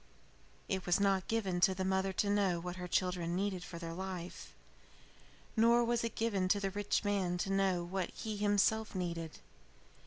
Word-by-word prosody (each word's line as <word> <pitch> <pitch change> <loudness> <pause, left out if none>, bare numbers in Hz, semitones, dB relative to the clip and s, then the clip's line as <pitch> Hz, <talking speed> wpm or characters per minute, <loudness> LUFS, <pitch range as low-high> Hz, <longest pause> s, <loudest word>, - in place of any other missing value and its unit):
"It 190 -1 -2
was 175 +2 +3
not 195 -2 +2
given 195 -6 0
to 190 +1 +4
the 190 0 -2
mother 190 0 +1
to 200 +2 0
know 195 -4 +2
what 180 +1 -5
her 180 0 -5
children 175 -1 0
needed 190 -1 -1
for 180 - -8
their 165 -1 -5
life. 185 -1 -6 1.0
Nor 235 +1 +5
was 235 0 +1
it 230 -1 -3
given 205 -5 0
to 200 +2 +3
the 195 -1 -1
rich 205 +1 0
man 195 -4 0
to 195 +2 -2
know 190 -3 +2
what 180 +1 -2
he 220 -1 -5
himself 205 +1 +2
needed. 170 -3 -3
190 Hz, 180 wpm, -34 LUFS, 180-205 Hz, 1.0 s, Nor